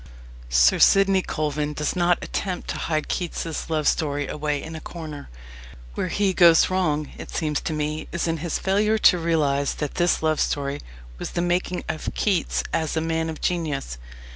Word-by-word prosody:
Sir - - +4
Sidney 195 -1 +5
Colvin 150 -3 -2
does 150 0 -2
not 175 0 +2
attempt 185 -3 -3
to - - -4
hide 155 -2 -1
Keats's 165 -3 -3
love 155 -2 0
story 145 -2 0
away 150 -1 -2
in 160 +2 -7
a 160 - -7
corner. 155 - -8 0.6
Where - - -2
he 195 +1 +1
goes 170 -1 +6
wrong, 155 -6 0
it - - -8
seems 150 -2 -1
to - - -3
me, 155 +1 -3
is 170 0 -1
in 165 0 0
his 160 +1 -2
failure 210 +3 +2
to 180 -4 +5
realize 145 -4 +1
that 150 -2 -4
this 175 -2 +2
love 155 -1 +1
story 140 0 -1 0.4
was - - -4
the 175 - 0
making 175 0 -1
of 155 -1 -3
Keats 195 -5 0
as 160 0 -1
a - - +3
man 160 0 -1
of 160 - -7
genius. 150 - -2
160 Hz, 180 wpm, -24 LUFS, 150-175 Hz, 0.6 s, goes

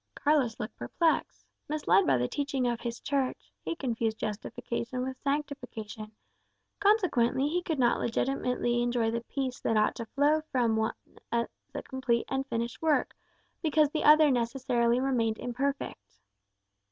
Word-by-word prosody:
Carlos 280 -7 +1
looked 215 - -5
perplexed. 315 - 0 0.2
Misled 300 -10 +3
by 135 -2 +4
the 125 0 0
teaching 280 - -1
of 235 -1 -1
his 235 -1 -4
Church, 275 -3 -2
he - - -3
confused 230 -6 -1
justification 235 +4 -4
with 260 0 -5
sanctification; 250 -7 -4 0.7
consequently 335 - +3
he 350 +4 0
could 325 -3 -2
not 240 -2 +3
legitimately 240 0 0
enjoy 240 -2 +1
the 235 0 -2
peace 260 +1 -4
that 225 - +1
ought 215 - +3
to 230 -2 -6
flow 295 +5 +2
from 240 -3 +2
the 220 - +1
one 220 - 0 0.4
as 235 0 +1 0.3
a - - -4
complete 260 -3 -1
and 270 0 -1
finished 235 -1 -3
work, 315 -2 +1 0.5
because 305 -2 +3
the 310 - -1
other 300 -1 +7
necessarily 240 -1 +1
remained 235 -5 +1
imperfect. 245 - -4
250 Hz, 150 wpm, -29 LUFS, 230-285 Hz, 0.7 s, other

